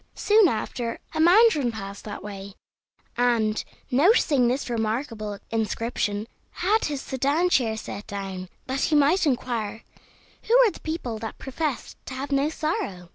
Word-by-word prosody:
Soon 425 -1 +5
after, 230 -1 -2 0.2
a 315 - -3
mandarin 340 - +5
passed 200 -2 -8
that 205 -1 -7
way, 200 -1 -8 0.6
and, 230 -3 +2 0.3
noticing 285 - +4
this 255 +4 -1
remarkable 225 -2 -2
inscription, 220 -1 -1 0.3
had 420 +5 +1
his 290 -3 -2
sedan 285 +7 +1
chair 225 -7 +2
set 205 -1 -7
down, 195 -2 -5 0.2
that 265 +1 -2
he 310 - +2
might 300 +5 +4
inquire 235 -5 -2 0.6
who 475 - +3
were 435 - +3
the - - -12
people 290 -9 -4
that 225 0 -6
professed 275 0 -4
to 260 - -5
have 275 +2 -5
no 280 +2 +2
sorrow. 200 - -3
245 Hz, 145 wpm, -25 LUFS, 215-300 Hz, 0.6 s, Soon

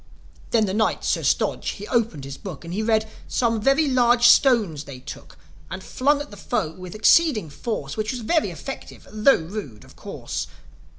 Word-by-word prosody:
Then 225 -2 +3
the 190 - -3
Knight, 215 +1 0
Sir - - +1
Stodge, - - 0
he 205 0 -8
opened 225 - 0
his 135 0 -7
Book, 175 -1 -9
And 170 - -6
he 210 - -1
read, 220 0 +1 0.2
"Some 230 -3 0
very 275 +6 +3
large 245 -2 +4
stones 220 - +4
they 140 -2 -9
took, 135 +3 -11 0.3
And 190 0 -7
flung 280 +7 +1
at 290 - -8
the 205 - -11
foe, 205 -5 -2
with 185 +2 -10
exceeding 220 - +3
force; 145 -6 -4
Which 215 0 -2
was 250 -2 -5
very 315 +8 +1
effective, - - -9
tho' 215 +6 +5
rude, 160 - -7
of - - -17
course." - - -5
215 Hz, 185 wpm, -23 LUFS, 175-245 Hz, 0.3 s, tho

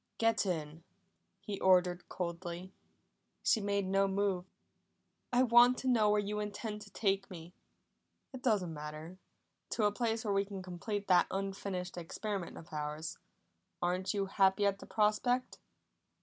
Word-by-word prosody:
"Get 225 -3 +2
in!" 160 -2 -3 0.6
he 205 -3 -5
ordered 180 -1 +3
coldly. 175 +1 -5 0.7
She 220 - +3
made 200 -1 0
no 195 +1 +2
move. 195 -2 0 0.9
"I 250 +1 +4
want 245 +1 +6
to 260 - -4
know 225 -4 +4
where 210 0 +4
you 210 +1 -2
intend 210 +1 -4
to 205 - -11
take 195 -2 0
me." 170 -1 -10 0.8
"It 260 - -7
doesn't 200 -9 +1
matter. 155 +4 -8 0.5
To 220 - -1
a 205 - +4
place 225 +1 -1
where 205 - +1
we 195 0 +3
can 195 -1 -7
complete 200 +3 -4
that 180 -2 +5
unfinished 195 -2 -3
experiment 190 +2 -4
of 160 - -12
ours. 150 +1 -4 0.6
Aren't 185 +3 0
you 200 -1 +1
happy 195 +1 +3
at 200 -1 +1
the - - -11
prospect?" 225 +4 +1
195 Hz, 150 wpm, -33 LUFS, 180-210 Hz, 0.9 s, want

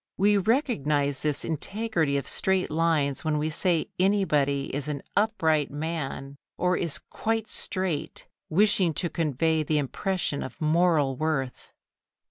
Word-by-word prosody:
We 205 +2 +4
recognise 150 - +1
this 150 -2 0
integrity 165 -2 -1
of 140 - -4
straight 190 -3 +1
lines 155 -4 +1
when 155 -1 0
we 155 +1 -1
say 170 0 0
anybody 150 -8 +1
is 140 0 -3
"an 145 -2 -4
upright 160 -9 +2
man" 145 -2 -4 0.2
or 180 0 +2
is 170 -4 0
"quite 225 0 -3
straight," 185 -8 -3 0.2
wishing 185 -2 +3
to 175 0 -2
convey 160 0 +1
the 155 0 0
impression 150 +2 -1
of - - -7
moral 155 -3 +2
worth. 150 -5 -2
160 Hz, 130 wpm, -26 LUFS, 145-185 Hz, 0.2 s, We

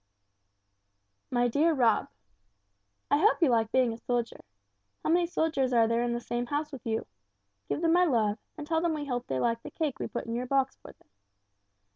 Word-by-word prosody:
"MY 245 -1 +2
DEAR 310 +7 +3
ROB: 235 -5 +3 1.0
"I 285 - +4
hope 425 +8 +4
you 325 -6 +4
like 225 -1 +2
being 255 -3 +3
a - - -8
soldier. 240 -1 -2 0.6
How - - +1
many 345 0 +3
soldiers 310 -6 0
are 230 -2 +5
there 230 +1 +1
in 240 0 0
the 240 - -1
same 240 0 -3
house 295 +2 -2
with 270 -4 -9
you? 225 0 -1 0.6
Give - - -1
them 330 -1 +3
my 360 +1 +5
love 220 -8 +1 0.2
and 300 - -6
tell 320 +1 0
them 335 -2 0
we 295 -1 -4
hope 245 -3 -3
they 130 - -1
liked 230 - 0
the - - -8
cake 305 -5 -3
we - - -2
put 240 - -5
in 230 - -4
your 245 +2 -2
box 270 0 +1
for - - -13
them. - - -31
255 Hz, 205 wpm, -29 LUFS, 235-310 Hz, 1.0 s, are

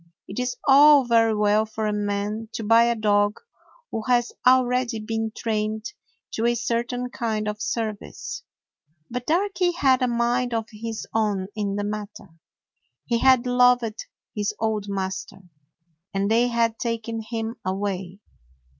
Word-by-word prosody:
It 195 - -6
is 250 0 -2
all 285 0 +7
very 225 -2 +3
well 210 +1 +3
for 220 0 -4
a 210 - 0
man 210 +2 -2
to 225 - -4
buy 230 +2 +5
a 235 0 +1
dog 205 -1 +2 0.5
who 225 - -2
has 240 -1 +2 0.2
already 250 -2 +3
been 225 +1 -3
trained 215 0 -2 0.4
to 225 +1 0
a 240 - +2
certain 240 +2 -2
kind 220 -3 -2
of 210 0 -4
service. 220 -2 -4 0.7
But 250 0 -4
Darky 360 +1 +1
had 270 -6 +3
a 255 - +2
mind 240 0 0
of 225 -1 -1
his 225 +1 -6
own 205 -4 0
in 205 -2 -2
the 205 - -2
matter. 210 -1 -6 0.8
He 235 -1 0
had 260 -1 +5
loved 245 -3 +2 0.3
his 210 0 -1
old 220 -2 -1
master, 190 0 -4 0.7
and 200 +2 0
they 235 +2 +4
had 230 -1 0
taken 230 -1 -3
him 225 +1 -4
away. 190 -1 -3
225 Hz, 145 wpm, -24 LUFS, 210-245 Hz, 0.8 s, all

